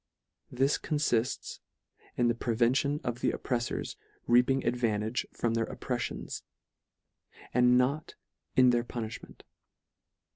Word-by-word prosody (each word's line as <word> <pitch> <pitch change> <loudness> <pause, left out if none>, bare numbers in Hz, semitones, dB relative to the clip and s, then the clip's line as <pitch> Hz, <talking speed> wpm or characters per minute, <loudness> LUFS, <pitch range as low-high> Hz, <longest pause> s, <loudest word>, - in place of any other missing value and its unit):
This 135 +3 +2
confifts 140 -6 -1 0.6
in 120 - +3
the 120 - +3
prevention 120 +5 +1
of 120 0 -3
the - - +2
oppreifors 120 -2 -2 0.3
reaping 125 +2 +4
advantage 115 -1 0
from 115 -1 -1
their 115 0 0
oppreffions, 125 -2 -4 1.1
and 125 0 +5
not 140 +5 0 0.4
in 125 -1 +6
their 120 -1 +2
punilhment. 115 -2 -7
125 Hz, 105 wpm, -30 LUFS, 120-130 Hz, 1.1 s, in